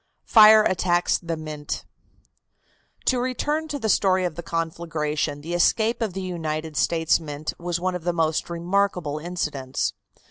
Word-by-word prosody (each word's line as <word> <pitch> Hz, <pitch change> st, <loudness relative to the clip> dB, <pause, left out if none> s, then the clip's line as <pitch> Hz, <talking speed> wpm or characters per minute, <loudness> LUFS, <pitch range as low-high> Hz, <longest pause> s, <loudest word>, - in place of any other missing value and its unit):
FIRE 215 Hz, -1 st, +8 dB
ATTACKS 175 Hz, -2 st, +1 dB
THE 170 Hz, -2 st, -4 dB
MINT. 155 Hz, -1 st, -5 dB, 1.2 s
To 255 Hz, -, +2 dB
return 295 Hz, +5 st, -1 dB
to 295 Hz, -2 st, -3 dB
the 225 Hz, -, -2 dB
story 190 Hz, -2 st, +3 dB
of 175 Hz, -, -2 dB
the 170 Hz, -, -6 dB
conflagration, 160 Hz, -3 st, -2 dB
the 165 Hz, +3 st, -5 dB
escape 220 Hz, +7 st, +2 dB
of 215 Hz, -5 st, -1 dB
the 190 Hz, +1 st, -4 dB
United 160 Hz, -3 st, -4 dB
States 165 Hz, +3 st, +2 dB
Mint 150 Hz, -1 st, -5 dB
was 175 Hz, 0 st, -2 dB
one 185 Hz, +1 st, -1 dB
of 180 Hz, -2 st, -5 dB
the 175 Hz, -, +1 dB
most 160 Hz, -2 st, 0 dB
remarkable 175 Hz, -3 st, -1 dB
incidents. 150 Hz, -6 st, -3 dB
170 Hz, 150 wpm, -24 LUFS, 155-190 Hz, 1.2 s, FIRE